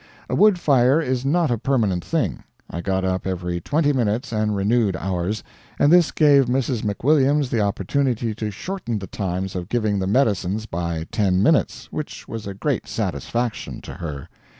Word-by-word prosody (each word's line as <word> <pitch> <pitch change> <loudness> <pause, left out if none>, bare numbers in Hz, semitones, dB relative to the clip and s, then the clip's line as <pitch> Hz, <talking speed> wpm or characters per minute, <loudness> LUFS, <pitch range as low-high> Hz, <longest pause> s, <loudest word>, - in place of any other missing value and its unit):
A - - +1
wood 210 -3 +5
fire 135 -1 +4
is 130 -5 -1
not 155 +1 +2
a 120 - 0
permanent 110 -9 +1
thing. - - -1 0.3
I 85 - -4
got 95 0 -1
up 95 0 -1
every 90 -2 -3
twenty 145 - +1
minutes 120 +1 0
and 105 -1 0
renewed 100 0 +2
ours, 95 +4 -2 0.3
and 145 - +4
this 175 -2 +6
gave 145 -3 +5
Mrs. 125 -2 0
McWilliams 140 +5 +2
the 115 - +1
opportunity 115 +4 0
to 110 0 -4
shorten 150 - -4
the 95 - -5
times 95 0 -3
of 90 -1 -4
giving 110 -4 0
the 95 - -1
medicines 105 -3 +1
by 85 -4 -3
ten 95 -3 +2
minutes, 160 - +2
which 155 - -6
was 110 -3 -6
a 100 - -5
great - - -2
satisfaction 120 -2 -3
to - - -8
her. 75 -6 -6
110 Hz, 175 wpm, -22 LUFS, 95-135 Hz, 0.3 s, this